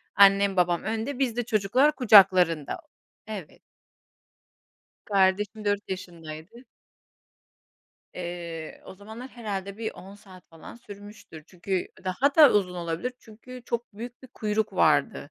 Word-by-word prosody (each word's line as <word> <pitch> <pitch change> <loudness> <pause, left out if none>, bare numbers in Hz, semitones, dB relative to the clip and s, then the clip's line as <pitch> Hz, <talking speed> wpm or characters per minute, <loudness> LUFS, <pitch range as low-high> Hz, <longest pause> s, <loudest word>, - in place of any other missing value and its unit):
annem, 200 0 +5
babam 175 -1 +2
önde 225 +6 -3
biz 250 -4 0
de 245 - 0
çocuklar 245 +7 +2
kucaklarında, 185 - +5 0.5
evet. 200 -8 -8 1.4
Kardeşim 205 +2 +1
4 205 0 -1
yaşındaydı. 175 +4 -9 1.5
Eee, 170 -2 -7
o - - -11
zamanlar 220 +6 -10
herhâlde 200 -4 -6
bir 225 - -4
on 195 +2 -12
saat 190 -3 -17
falan 165 +5 -13
sürmüştür 205 -7 -13
çünkü 185 +1 -4 0.2
daha 260 +10 0
da 300 -4 +8
uzun 185 -3 +1
olabilir, 170 +8 -4
çünkü 245 +3 -13
çok 235 -2 -4
büyük 240 +4 -9
bir 260 - -13
kuyruk 215 -1 -2
vardı, - - +1
200 Hz, 120 wpm, -26 LUFS, 180-225 Hz, 1.5 s, da